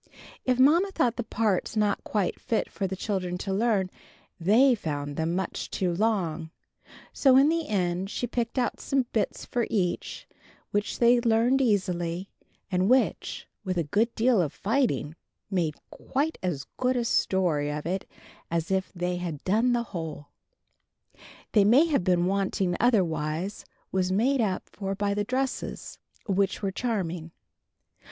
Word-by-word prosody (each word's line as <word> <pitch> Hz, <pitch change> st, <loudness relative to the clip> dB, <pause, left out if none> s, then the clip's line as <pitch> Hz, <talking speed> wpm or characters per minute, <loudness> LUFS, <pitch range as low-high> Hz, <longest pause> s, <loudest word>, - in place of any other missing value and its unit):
If 255 Hz, -1 st, +2 dB
Mamma 320 Hz, +9 st, +5 dB
thought 245 Hz, -11 st, +1 dB
the 240 Hz, -, -1 dB
parts 215 Hz, -1 st, -1 dB
not 210 Hz, -1 st, +1 dB
quite 205 Hz, -4 st, -1 dB
fit 225 Hz, -, -1 dB
for 195 Hz, -, -2 dB
the 190 Hz, -, -4 dB
children 185 Hz, -3 st, -2 dB
to 195 Hz, +1 st, -3 dB
learn, 200 Hz, -3 st, +1 dB, 0.5 s
they 225 Hz, +10 st, +5 dB
found 145 Hz, -8 st, -3 dB
them 160 Hz, +3 st, -1 dB
much 190 Hz, -1 st, -3 dB
too 180 Hz, -2 st, -1 dB
long: 175 Hz, -5 st, 0 dB, 0.6 s
so 265 Hz, -2 st, +5 dB
in 275 Hz, +3 st, +6 dB
the 330 Hz, -1 st, 0 dB
end 185 Hz, -2 st, -1 dB
she 245 Hz, -, -2 dB
picked 240 Hz, +1 st, -3 dB
out 245 Hz, -2 st, 0 dB
some 270 Hz, -2 st, 0 dB
bits 215 Hz, -3 st, -1 dB
for 240 Hz, -2 st, -1 dB
each, 180 Hz, -5 st, -2 dB, 0.4 s
which 205 Hz, 0 st, -1 dB
they 240 Hz, 0 st, +5 dB
learned 235 Hz, +3 st, +3 dB
easily, 185 Hz, -5 st, 0 dB, 0.4 s
and 185 Hz, +2 st, +2 dB
which, 255 Hz, +1 st, +1 dB, 0.2 s
with 185 Hz, -2 st, -2 dB
a 170 Hz, -, +2 dB
good 215 Hz, +10 st, 0 dB
deal 235 Hz, -3 st, +3 dB
of 155 Hz, -5 st, -2 dB
fighting, 215 Hz, -, 0 dB, 0.4 s
made 165 Hz, -5 st, 0 dB, 0.2 s
quite 295 Hz, +4 st, -2 dB
as 160 Hz, -7 st, -2 dB
good 255 Hz, 0 st, +1 dB
a 240 Hz, -, 0 dB
story 170 Hz, -9 st, +1 dB
of 150 Hz, 0 st, -4 dB
it 185 Hz, +3 st, -3 dB, 0.4 s
as 165 Hz, +1 st, -1 dB
if 190 Hz, 0 st, 0 dB
they 180 Hz, 0 st, -2 dB
had 170 Hz, -5 st, -5 dB
done 225 Hz, +6 st, +2 dB
the 240 Hz, -1 st, +1 dB
whole. 160 Hz, -4 st, -5 dB, 1.2 s
What 205 Hz, -2 st, +5 dB
may 260 Hz, +9 st, +6 dB
have 295 Hz, -, +1 dB
been 175 Hz, -1 st, +2 dB
wanting 190 Hz, -1 st, 0 dB
otherwise 175 Hz, -5 st, 0 dB, 0.3 s
was 185 Hz, -1 st, 0 dB
made 245 Hz, +7 st, +2 dB
up 190 Hz, -4 st, -1 dB
for 195 Hz, -1 st, -4 dB
by 200 Hz, 0 st, 0 dB
the 205 Hz, 0 st, 0 dB
dresses, 260 Hz, +4 st, -3 dB, 0.3 s
which 200 Hz, 0 st, 0 dB
were 195 Hz, -, 0 dB
charming. 180 Hz, -8 st, -2 dB
195 Hz, 155 wpm, -27 LUFS, 180-235 Hz, 1.2 s, in